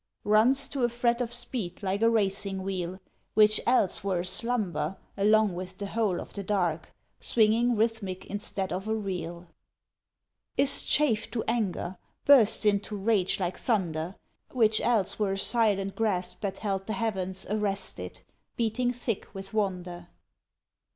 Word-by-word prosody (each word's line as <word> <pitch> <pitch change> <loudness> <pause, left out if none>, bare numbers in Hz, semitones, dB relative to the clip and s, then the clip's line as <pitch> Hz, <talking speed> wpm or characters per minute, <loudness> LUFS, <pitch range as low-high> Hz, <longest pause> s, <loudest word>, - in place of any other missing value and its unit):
Runs 235 +7 +4
to 270 -3 -2
a 240 - +3
fret 235 0 0
of 240 -1 -2
speed 240 -6 -2
like 195 +2 -1
a 230 - +5
racing 195 -3 0
wheel, 185 -1 -3 0.4
Which 215 0 +5
else 235 -8 +2
were 190 -3 0
aslumber 185 -4 0 0.2
along 210 0 +3
with 185 +1 -7
the 200 - -4
whole 205 -3 0
Of - - -9
the 200 - -4
dark, 180 -5 -1 0.3
swinging 230 +2 +2
rhythmic 215 -4 -1
instead 200 -2 -4
of 190 +3 -4
a 220 - 0
reel. 180 -4 -5 1.1
Is 280 - +5
chafed 250 -8 +2
to 225 - -1
anger, 195 -5 -1 0.3
bursts 240 -6 +6
into 205 0 +1
rage 200 -2 +1
like 180 -1 -2
thunder; 180 -6 -1 0.3
Which 220 -4 +3
else 220 -5 +1
were 200 -2 +1
a - - -3
silent 195 -3 +2
grasp 195 -5 -1
that 200 -3 -3
held 195 -2 -3
the 220 - -2
heavens 190 -5 -3
Arrested, 205 -1 -3 0.3
beating 240 +2 0
thick 240 -3 -3
with 195 +1 -8
wonder. 180 -4 -2
205 Hz, 145 wpm, -28 LUFS, 190-225 Hz, 1.1 s, bursts